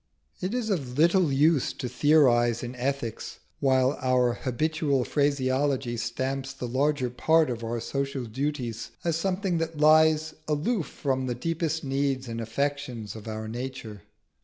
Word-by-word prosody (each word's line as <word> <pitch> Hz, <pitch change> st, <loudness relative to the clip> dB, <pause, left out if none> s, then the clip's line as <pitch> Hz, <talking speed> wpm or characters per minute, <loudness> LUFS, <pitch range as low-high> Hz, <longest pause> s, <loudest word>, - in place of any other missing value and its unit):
It 190 Hz, +6 st, -2 dB
is 230 Hz, -4 st, -1 dB
of 135 Hz, -9 st, -2 dB
little 170 Hz, 0 st, +4 dB
use 145 Hz, +1 st, +3 dB
to 125 Hz, -, -5 dB
theorise 120 Hz, -4 st, +3 dB
in 120 Hz, +1 st, -5 dB
ethics 125 Hz, -2 st, -3 dB, 0.2 s
while 130 Hz, 0 st, +2 dB
our 125 Hz, -2 st, +2 dB
habitual 140 Hz, +2 st, 0 dB
phraseology 135 Hz, -3 st, 0 dB
stamps 130 Hz, +4 st, -3 dB
the 125 Hz, -2 st, -5 dB
larger 130 Hz, 0 st, 0 dB
part 160 Hz, +3 st, +3 dB
of 115 Hz, -1 st, -5 dB
our 115 Hz, +1 st, -2 dB
social 135 Hz, +1 st, -3 dB
duties 120 Hz, -1 st, -3 dB
as 170 Hz, -2 st, +1 dB
something 185 Hz, 0 st, 0 dB
that 165 Hz, -1 st, -3 dB
lies 155 Hz, +1 st, +4 dB
aloof 160 Hz, +6 st, 0 dB
from 130 Hz, -2 st, -2 dB
the 120 Hz, -, -2 dB
deepest 160 Hz, +3 st, -2 dB
needs 135 Hz, -1 st, -1 dB
and 115 Hz, 0 st, -4 dB
affections 125 Hz, -2 st, -3 dB
of 110 Hz, 0 st, -9 dB
our 110 Hz, 0 st, -4 dB
nature. 120 Hz, -3 st, -6 dB
135 Hz, 145 wpm, -27 LUFS, 125-155 Hz, 0.2 s, little